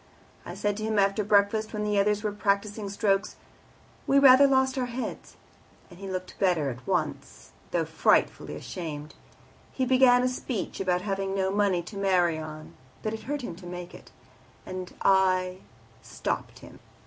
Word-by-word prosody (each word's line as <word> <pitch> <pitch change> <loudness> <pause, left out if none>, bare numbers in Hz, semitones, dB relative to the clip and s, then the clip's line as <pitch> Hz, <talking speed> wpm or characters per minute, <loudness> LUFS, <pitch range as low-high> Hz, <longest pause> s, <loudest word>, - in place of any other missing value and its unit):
I - - -6
said 205 -1 -1
to 215 - -5
him 220 0 -1
after 200 +1 +2
breakfast, 210 +2 +2
when 210 -1 -2
the 210 -1 +1
others 210 +1 +1
were 210 - -1
practising 205 0 -1
strokes, 195 -1 0 0.7
'We 275 - +4
rather 275 0 +8
lost 265 -1 +2
our 255 -2 -1
heads,' 245 +1 -6 0.6
and 175 - -14
he 195 -1 -7
looked 185 -1 -6
better 170 -8 +2
at 120 +1 -11
once, - - -3 0.2
though - - 0
frightfully - - +1
ashamed. 150 -3 -7 0.6
He 260 - -1
began 255 -1 +5
a - - +3
speech 250 -3 -4
about 180 -2 0
having 195 -1 -2
no 190 -1 0
money 195 -3 +1
to 200 +4 -9
marry 180 -4 +2
on, 155 0 -9 0.3
but 215 - -2
it 220 - -7
hurt 290 0 -3
him 175 - -5
to 180 -1 -11
make 175 0 -7
it, - - -13 0.6
and 185 -1 -6
I 185 -1 +3 0.4
stopped - - -4
him. - - -14
200 Hz, 170 wpm, -27 LUFS, 185-220 Hz, 0.7 s, rather